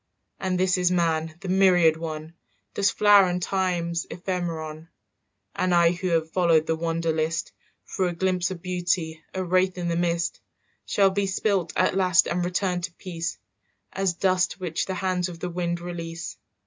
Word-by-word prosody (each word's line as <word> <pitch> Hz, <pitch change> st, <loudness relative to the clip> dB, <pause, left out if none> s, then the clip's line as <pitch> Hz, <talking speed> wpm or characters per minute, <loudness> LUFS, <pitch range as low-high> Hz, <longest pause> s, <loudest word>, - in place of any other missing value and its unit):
"And 185 Hz, -1 st, -1 dB
this 185 Hz, 0 st, +2 dB
is 180 Hz, -1 st, +3 dB
man, 165 Hz, -3 st, 0 dB
the 195 Hz, -, -6 dB
myriad 180 Hz, -4 st, +5 dB
one, 160 Hz, 0 st, -6 dB, 0.4 s
Dust's 200 Hz, 0 st, +2 dB
flower 205 Hz, -2 st, +6 dB
and 180 Hz, 0 st, -1 dB
time's 175 Hz, -2 st, -1 dB
ephemeron. 165 Hz, -3 st, -4 dB, 0.7 s
"And 185 Hz, -1 st, +1 dB
I 170 Hz, -1 st, +5 dB
who 180 Hz, +1 st, -3 dB
have 165 Hz, -2 st, 0 dB
followed 165 Hz, -3 st, +3 dB
the 160 Hz, -, 0 dB
wander 165 Hz, 0 st, -1 dB
list 160 Hz, +1 st, -1 dB, 0.3 s
For 185 Hz, -, -1 dB
a 175 Hz, -, -2 dB
glimpse 180 Hz, 0 st, 0 dB
of 185 Hz, -3 st, -7 dB
beauty, 175 Hz, -3 st, -1 dB
a 190 Hz, -, -1 dB
wraith 185 Hz, +1 st, +1 dB
in 175 Hz, -1 st, -2 dB
the 170 Hz, -, 0 dB
mist, 170 Hz, 0 st, -1 dB, 0.5 s
"Shall 195 Hz, -1 st, +3 dB
be 200 Hz, +1 st, 0 dB
spilt 190 Hz, -3 st, 0 dB
at -, -, +2 dB
last 185 Hz, -2 st, +4 dB
and 175 Hz, +1 st, -1 dB
return 180 Hz, 0 st, -1 dB
to 175 Hz, 0 st, -5 dB
peace, 165 Hz, -3 st, -5 dB, 0.6 s
As 195 Hz, -2 st, 0 dB
dust 185 Hz, 0 st, +1 dB
which 175 Hz, -3 st, -2 dB
the 190 Hz, -, -2 dB
hands 185 Hz, -2 st, -1 dB
of 170 Hz, -2 st, -9 dB
the 180 Hz, +1 st, -4 dB
wind 175 Hz, 0 st, -2 dB
release. 170 Hz, -1 st, -6 dB
175 Hz, 175 wpm, -25 LUFS, 165-185 Hz, 0.7 s, flower